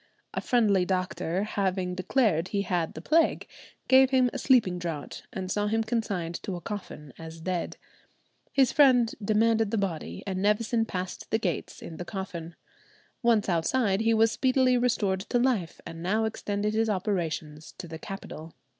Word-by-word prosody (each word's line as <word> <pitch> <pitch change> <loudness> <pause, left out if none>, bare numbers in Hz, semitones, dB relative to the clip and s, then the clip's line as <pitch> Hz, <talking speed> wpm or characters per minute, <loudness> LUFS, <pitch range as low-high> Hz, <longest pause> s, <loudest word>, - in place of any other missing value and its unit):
A - - -2
friendly 210 -6 +3
doctor 185 0 -1
having 190 -3 -1
declared 185 -2 +1
he 200 +1 -1
had 175 -3 -1
the 160 - -8
plague, 325 +2 +2 0.4
gave 265 0 +6
him 255 -2 +3
a - - -3
sleeping 220 -9 +3
draught, 165 -4 -6
and 185 -1 -4
saw 205 0 0
him 225 +1 +1
consigned 200 -7 -2
to 195 - -4
a - - -5
coffin 170 - -7
as 165 0 -9
dead. 175 +1 -3 0.7
His 265 -2 +3
friend 250 -5 +5
demanded 220 +1 +2
the 225 - -1
body, 160 - -3
and 190 -1 -3
Nevison 225 +3 +2
passed 185 -2 -5
the 220 - +2
gates 190 -6 -3
in 160 - -8
the - - -4
coffin. 175 -4 -6 0.7
Once 230 -4 +3
outside, 195 +4 +1
he 225 0 +3
was 225 0 +4
speedily 255 0 +3
restored 225 -6 +1
to 245 - +2
life, 240 -9 0
and 165 0 -8
now 210 +6 +1
extended 210 -1 -2
his 225 0 +1
operations 165 -6 -2
to 180 - -7
the 160 -1 -8
capital. 165 -5 -8
200 Hz, 165 wpm, -28 LUFS, 175-225 Hz, 0.7 s, gave